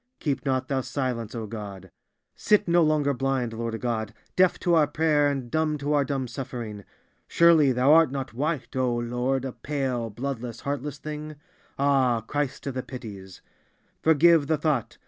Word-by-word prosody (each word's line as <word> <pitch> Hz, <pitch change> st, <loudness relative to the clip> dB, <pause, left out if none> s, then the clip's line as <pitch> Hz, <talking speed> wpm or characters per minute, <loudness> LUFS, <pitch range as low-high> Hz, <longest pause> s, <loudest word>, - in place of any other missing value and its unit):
Keep 140 Hz, -4 st, -2 dB
not 130 Hz, -1 st, 0 dB
thou 135 Hz, -1 st, 0 dB
silence, 125 Hz, -4 st, -3 dB
O 115 Hz, -2 st, -4 dB
God! 100 Hz, -4 st, -8 dB, 0.4 s
Sit 210 Hz, -1 st, +2 dB
no 170 Hz, 0 st, +4 dB
longer 155 Hz, -3 st, +2 dB
blind, 130 Hz, -3 st, -1 dB
Lord 115 Hz, 0 st, -4 dB
God, 110 Hz, -3 st, -3 dB, 0.2 s
deaf 185 Hz, -1 st, +4 dB
to 175 Hz, -, +2 dB
our 155 Hz, -3 st, +5 dB
prayer 150 Hz, -1 st, +2 dB
and 135 Hz, -4 st, -4 dB
dumb 155 Hz, -1 st, +1 dB
to 145 Hz, +1 st, -1 dB
our 145 Hz, -1 st, +3 dB
dumb 135 Hz, -1 st, -2 dB
suffering. 115 Hz, -4 st, -6 dB, 0.4 s
Surely 165 Hz, -5 st, +5 dB
Thou 125 Hz, +2 st, +2 dB
too -, -, +8 dB
art 165 Hz, -4 st, +5 dB
not 135 Hz, -4 st, -4 dB
white, 145 Hz, +3 st, -3 dB
O 130 Hz, -2 st, +1 dB
Lord, 125 Hz, +3 st, -1 dB
a 130 Hz, -, -3 dB
pale, 130 Hz, -5 st, -3 dB
bloodless, 120 Hz, 0 st, -5 dB
heartless 145 Hz, +1 st, -3 dB
thing? 150 Hz, +1 st, -7 dB, 0.4 s
Ah! 135 Hz, -4 st, +2 dB
Christ 145 Hz, +4 st, -3 dB
of 135 Hz, -2 st, -4 dB
all 130 Hz, -, -1 dB
the -, -, -19 dB
Pities! 100 Hz, -8 st, -9 dB, 0.6 s
Forgive 160 Hz, -1 st, +5 dB
the 160 Hz, 0 st, +2 dB
thought! 140 Hz, -6 st, -1 dB
135 Hz, 175 wpm, -26 LUFS, 120-150 Hz, 0.6 s, too